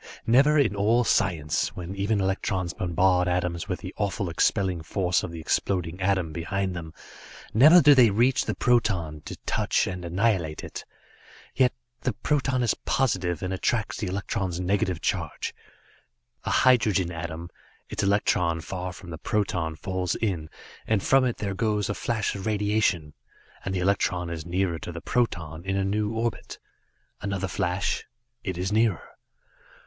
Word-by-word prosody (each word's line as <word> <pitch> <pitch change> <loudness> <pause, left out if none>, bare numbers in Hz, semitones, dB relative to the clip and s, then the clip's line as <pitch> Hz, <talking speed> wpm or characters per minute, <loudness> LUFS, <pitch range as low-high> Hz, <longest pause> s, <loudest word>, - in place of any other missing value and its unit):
Never 140 +6 +5
in 120 -9 +3
all 110 +5 +3
science, 85 -10 +1
when 90 +1 -6
even 100 +2 0
electrons 95 -2 -1
bombard 90 +1 +2
atoms 90 +1 -1
with 90 - -3
the 95 -1 -7
awful 100 -3 -1
expelling 95 0 +1
force 90 +2 0
of - - -5
the 85 0 -7
exploding 90 +2 -1
atom 95 -4 +1
behind 95 +3 -2
them, 80 -2 -6 0.6
never 155 +10 +8
do 145 +1 +8
they 125 -4 +6
reach 120 +6 +2
the - - -2
proton, 95 -11 +1
to - - -6
touch - - +1
and 90 -1 -5
annihilate 90 -3 0
it. - - -7 0.7
Yet 130 -2 +3 0.3
the 125 - -1
proton 130 +1 0
is 120 - +2
positive 95 - -1
and 90 0 -2
attracts 105 +3 -1
the 105 - -3
electron's 95 -2 -2
negative 90 -2 0
charge. - - -2 0.9
A - - -1
hydrogen 105 -8 +3
atom 85 0 -6 0.4
its - - -3
electron 90 -4 +2
far 90 +2 -5
from 90 -1 -11
the 80 - -7
proton 90 -6 -1
falls 90 +2 -2
in, 90 -8 -2 0.4
and 110 -3 +1
from 135 -1 +4
it 120 - -1
there 100 -2 -3
goes 105 0 0
a - - +1
flash 110 -1 -1
of 100 +1 -5
radiation, 105 -7 +1 0.5
and 95 - -3
the - - 0
electron 90 -2 0
is 80 0 -6
nearer 90 -1 0
to 85 - -6
the 85 - -6
proton, 85 -9 -1
in 95 +1 -2
a 95 - +1
new 105 +2 0
orbit. 115 +1 -3 0.6
Another 100 -1 -2
flash 90 +1 -1 0.4
it 95 -5 -3
is 90 +2 -2
nearer. 110 -4 +2
95 Hz, 160 wpm, -26 LUFS, 85-110 Hz, 0.9 s, never